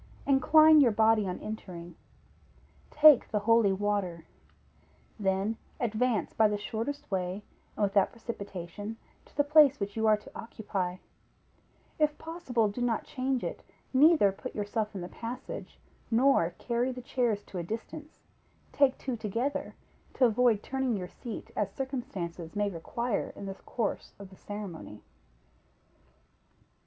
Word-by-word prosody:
Incline 310 +3 +6
your 255 - +6
body 220 -1 +3
on 180 - -3
entering; 175 -6 -7 0.9
take 300 -3 +7
the 215 - 0
holy 230 -1 +4
water; 190 -4 -1 0.9
then 195 +2 0 0.2
advance 230 -3 0
by 220 - +4
the 210 0 -1
shortest 225 +6 -5
way, 185 +1 -2 0.3
and 215 - -1
without 200 -1 +3
precipitation, 205 -2 -7 0.3
to - - -24
the 290 - +5
place 290 -1 +6
which 200 0 -4
you 220 -1 +1
are 215 -1 +5
to 210 - -14
occupy; 195 -5 -4 1.0
if 300 -1 +2
possible, 290 -9 -1
do 210 +4 -5
not 235 -2 0
change 260 -1 -2
it; - - -4 0.3
neither 290 - +6
put 230 +6 -8
yourself 210 +1 -2
in 190 - -4
the 175 - -5
passage, 250 - -7 0.3
nor 240 -7 +4
carry 240 +1 -1
the 250 -1 -8
chairs 235 -5 0
to 185 - -7
a - - -3
distance; 230 - -7 0.5
take 275 -2 +3
two 260 -3 -3
together, 230 +6 -3 0.4
to 260 - +4
avoid 235 -2 +3
turning 265 -4 -1
your 180 -2 -6
seat 235 -4 -8
as 210 - -1
circumstances 210 - -5
may 205 -1 0
require 220 +7 -3
in 200 - -8
the 195 - -4
course 215 +2 -4
of 200 -1 -11
the - - -13
ceremony. 190 - -8
220 Hz, 140 wpm, -29 LUFS, 200-255 Hz, 1.0 s, take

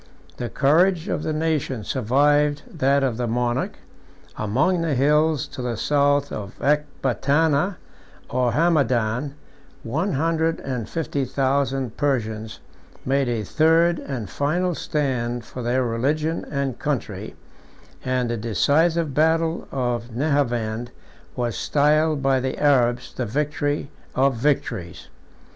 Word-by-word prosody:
The 120 - -4
courage 165 +6 +3
of - - -1
the 155 - -2
nation 155 -7 -1
survived 145 +6 +2 0.2
that 140 +1 +3
of 125 -4 0
the 120 -1 -1
monarch: 120 +2 -1 0.6
among 135 - +1
the 160 -4 0
hills 150 +2 +3
to - - -7
the 120 -2 -2
south 145 -1 +2
of 100 -3 -6
Ecbatana 150 - +1 0.5
or 125 -1 +1
Hamadan, 135 -4 +1 0.5
one 160 - -1
hundred 165 +2 +1
and 125 -5 -4
fifty 145 -4 -2
thousand 135 -1 -1
Persians 110 - -2 0.5
made 135 -1 +1
a 115 -3 -1
third 165 - +3
and 125 -7 -5
final 175 - 0
stand 125 -7 -2
for 125 - -7
their 125 +2 +1
religion 150 +8 -1
and 140 -4 -2
country; 110 -8 -3 0.7
and 130 -1 0
the 120 - -1
decisive 150 - +1
battle 160 +2 +1
of 120 -2 -2
Nehavend 120 -5 0 0.5
was 120 -2 -2
styled 150 0 +2
by 135 -1 +3
the 130 0 -3
Arabs 125 -4 +2
the 125 - -3
victory 145 +3 -1 0.2
of 135 +1 +3
victories. 115 - -2
140 Hz, 120 wpm, -23 LUFS, 120-150 Hz, 0.7 s, courage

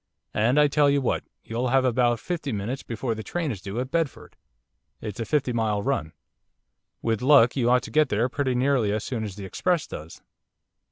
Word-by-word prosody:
And 120 +7 +3
I 150 - +6
tell 145 0 +3
you 140 0 +3
what, 130 - -1 0.2
you'll 120 +3 -2
have 130 +1 +3
about 120 -1 +2
fifty 160 -3 -3
minutes 110 +5 -3
before 115 +1 -3
the 110 - -6
train 160 - -2
is 100 -6 -6
due 100 +5 -4
at 130 +1 -4
Bedford. 165 -4 -2 0.6
It's 105 -1 -6
a 115 - -2
fifty 130 0 0
mile 110 -3 0
run. 120 - -1 0.9
With 115 -2 0
luck 130 -3 +6
you 120 -3 +2
ought 125 0 +4
to - - -8
get 155 -2 +3
there 110 +4 +1
pretty 130 0 -1
nearly 125 -4 +2
as 105 +1 -1
soon 115 -4 -3
as 100 -3 -5
the 100 -1 -7
express 175 - 0
does. 80 +2 -9
125 Hz, 205 wpm, -25 LUFS, 110-140 Hz, 0.9 s, I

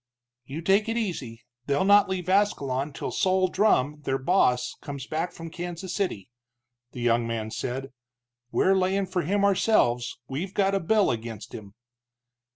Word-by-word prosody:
"You 150 +6 -6
take 200 +5 +3
it 225 - -1
easy, 135 - -4 0.2
they'll 140 +4 +2
not 200 0 +6
leave 185 -2 -3
Ascalon 145 -9 +1
till - - -5
Sol 185 0 +2
Drumm, 150 -8 +2
their 135 -2 -1
boss, 135 -4 +2
comes 140 -3 -6
back 160 +4 -2
from 165 -1 -9
Kansas 175 +2 -5
City," 180 - -2 0.6
the 125 - -7
young 120 -1 +2
man 110 -1 -3
said. 130 +4 -4 0.6
"We're 190 - +3
layin' 190 +1 +1
for 185 -1 -1
him 200 +5 +1
ourselves, 185 - +2
we've 170 +9 -5
got 195 -1 +2
a 195 - +2
bill 205 +3 +2
against 115 -2 -6
him." 100 -2 -10
165 Hz, 160 wpm, -26 LUFS, 130-195 Hz, 0.6 s, not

